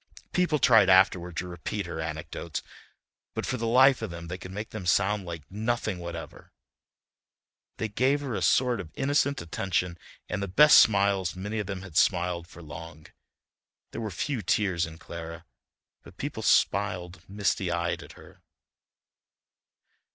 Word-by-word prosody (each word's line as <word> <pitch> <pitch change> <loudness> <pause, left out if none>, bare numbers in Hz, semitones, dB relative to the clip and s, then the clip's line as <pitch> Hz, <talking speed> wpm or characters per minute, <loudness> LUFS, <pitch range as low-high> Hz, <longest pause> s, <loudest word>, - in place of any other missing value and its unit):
People 180 -4 +2
tried 115 -8 +5
afterward 90 -2 +4
to 90 - -2
repeat 90 +3 -4
her 85 -2 -6
anecdotes 80 0 -5 0.7
but - - -2
for 125 - -2
the 115 -1 -2
life 130 +3 +5
of - - -3
them 85 -1 -8
they 90 - -4
could 90 - -9
make 105 +3 -6
them 100 -5 -6
sound 100 +2 +2
like 85 -3 -6
nothing 110 -2 -2
whatever. 85 -1 -8 1.3
They 110 - -2
gave 130 +7 +1
her 135 -4 -4
a - - -2
sort 125 -3 +3
of 90 -5 -7
innocent 140 -3 +1
attention 90 0 -2 0.3
and 105 - -3
the 100 - -2
best 150 +11 +8
smiles 100 -4 +3
many 105 +4 -4
of 105 - -3
them 95 -1 -5
had 90 -4 -6
smiled 85 -2 +2
for 85 -1 -13
long; 80 +1 -10 0.9
there - - -5
were 110 - -3
few 120 - -2
tears 90 -3 +1
in 80 0 -11
Clara, 85 -1 -8 0.6
but - - -16
people - - -4
smiled 90 -1 +1
misty 100 -2 -1
eyed 85 0 -1
at - - -12
her. - - -16
95 Hz, 160 wpm, -27 LUFS, 85-110 Hz, 1.3 s, best